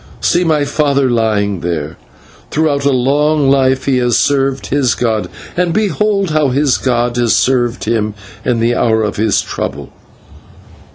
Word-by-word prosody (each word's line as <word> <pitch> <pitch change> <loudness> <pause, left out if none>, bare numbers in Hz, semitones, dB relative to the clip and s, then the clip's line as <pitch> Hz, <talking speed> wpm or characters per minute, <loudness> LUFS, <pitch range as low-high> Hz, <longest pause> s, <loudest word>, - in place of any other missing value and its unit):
See 175 - +1
my 155 -4 +1
father 140 -3 +1
lying 105 -4 0
there; 80 -3 -4 0.5
throughout 145 -3 0
a - - +4
long 140 +2 +2
life 130 -1 +2
he 135 -2 +1
has 120 -2 +1
served 135 -1 0
his 135 -4 0
god, 110 -3 -1 0.3
and 175 -1 0
behold 205 -2 0
how 155 -1 +2
his 135 0 +1
god 120 -1 0
has 120 -2 +2
served 125 -2 0
him 110 -2 -1 0.3
in 125 -2 0
the 120 +1 +2
hour 110 -1 +1
of 105 - -3
his 110 -1 +1
trouble. - - -6
130 Hz, 155 wpm, -14 LUFS, 115-145 Hz, 0.5 s, a